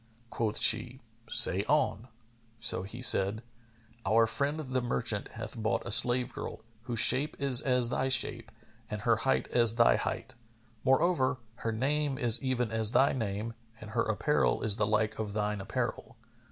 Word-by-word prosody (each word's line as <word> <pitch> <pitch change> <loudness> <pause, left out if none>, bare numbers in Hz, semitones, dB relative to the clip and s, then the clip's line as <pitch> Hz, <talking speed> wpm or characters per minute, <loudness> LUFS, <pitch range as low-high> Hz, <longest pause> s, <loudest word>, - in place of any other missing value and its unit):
Quoth 110 -2 -3
she, 120 +3 +3 0.3
"Say 95 +3 +5
on"; 130 -5 -1 0.5
so 110 - 0
he 110 +6 -7
said, 105 0 +4 0.6
"Our 115 +1 +2
friend 140 +6 -3
the 130 -4 -3
merchant 115 -3 -2
hath 110 +1 -9
bought 110 -1 -3
a - - -6
slave 120 +2 +3
girl, - - -8 0.2
whose 120 -1 -5
shape 145 +7 +5
is 135 -4 +2
as 125 -2 0
thy 130 +1 -2
shape 130 -1 +1 0.4
and 105 -1 -6
her 115 0 +1
height 135 +4 -1
as 115 -2 +1
thy 115 0 +3
height; 130 - -5 0.5
more 135 +3 +2
over, 135 -8 0 0.2
her 115 - -4
name 140 +4 -2
is 120 -2 +4
even 125 -4 -2
as 110 +1 -2
thy 135 - +2
name 110 -1 -5 0.3
and 110 0 -11
her 115 +1 -1
apparel 130 +8 -1
is 110 -2 +2
the 105 -2 -1
like 110 0 -1
of 105 -2 -5
thine 105 -1 -3
apparel. - - -5
115 Hz, 165 wpm, -29 LUFS, 110-130 Hz, 0.6 s, Say